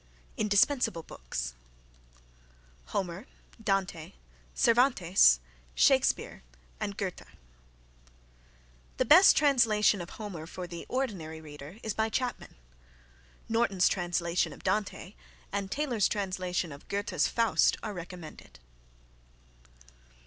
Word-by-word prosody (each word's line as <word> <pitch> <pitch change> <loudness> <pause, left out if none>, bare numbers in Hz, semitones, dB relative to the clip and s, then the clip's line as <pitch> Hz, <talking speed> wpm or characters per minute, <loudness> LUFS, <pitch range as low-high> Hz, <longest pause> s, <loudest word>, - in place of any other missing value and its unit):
INDISPENSABLE 215 - +2
BOOKS - - -6 1.3
Homer, 185 - -4 0.4
Dante, 195 -6 -1 0.4
Cervantes, 195 - +4 0.4
Shakespeare - - +2 0.4
and 200 0 -4
Goethe. 190 -3 -4 1.8
(The 255 - +1
best 330 - +8
translation 225 -8 +3
of 175 - -8
Homer 190 -8 -7
for 180 +1 -7
the 170 -1 -8
ordinary 190 -12 -3
reader 150 +3 -11
is 220 - -2
by 220 0 0
Chapman. 250 +2 -3 0.9
Norton's 205 -5 +2
translation 175 -2 0
of - - -15
Dante 190 0 -2 0.4
and 200 -1 -3
Taylor's 250 -5 0
translation 185 -4 -2
of 140 +1 -12
Goethe's 200 +1 0
Faust 230 -2 +2
are 215 - -4
recommended.) 175 -2 -10
195 Hz, 95 wpm, -29 LUFS, 170-220 Hz, 1.8 s, best